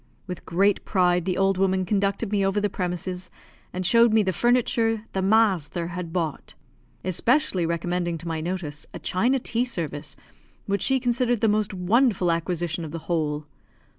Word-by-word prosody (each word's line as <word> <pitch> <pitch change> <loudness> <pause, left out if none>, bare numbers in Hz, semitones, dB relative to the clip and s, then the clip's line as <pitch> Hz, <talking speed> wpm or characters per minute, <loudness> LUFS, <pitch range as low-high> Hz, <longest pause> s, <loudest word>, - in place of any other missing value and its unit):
With 180 -3 -8
great 195 +4 +2
pride 180 -2 +2
the 185 -1 -1
old 195 -1 +2
woman 190 -1 +2
conducted 200 +2 0
me 200 -2 +2
over 195 +1 +1
the 205 -1 -1
premises, 180 0 -3 0.4
and 185 +1 -3
showed 230 +4 +5
me 220 -1 +4
the 190 -1 0
furniture 230 0 +2
"the 190 - 0
masther" 190 -5 +2
had 175 -1 -5
bought; 165 -4 -3 0.5
especially 185 - +1
recommending 175 0 -1
to 165 +2 -9
my 160 -1 -2
notice 160 -4 -5
a - - -3
china 240 +9 +1
tea 235 -1 -1
service, 155 - -4 0.5
which 200 0 -1
she 265 0 +2
considered 245 -2 0
the 225 - +4
most 210 -1 +1
wonderful 190 0 +2
acquisition 170 0 -2
of 160 - -5
the 165 - -5
whole. 150 -3 -1
185 Hz, 165 wpm, -25 LUFS, 170-215 Hz, 0.5 s, showed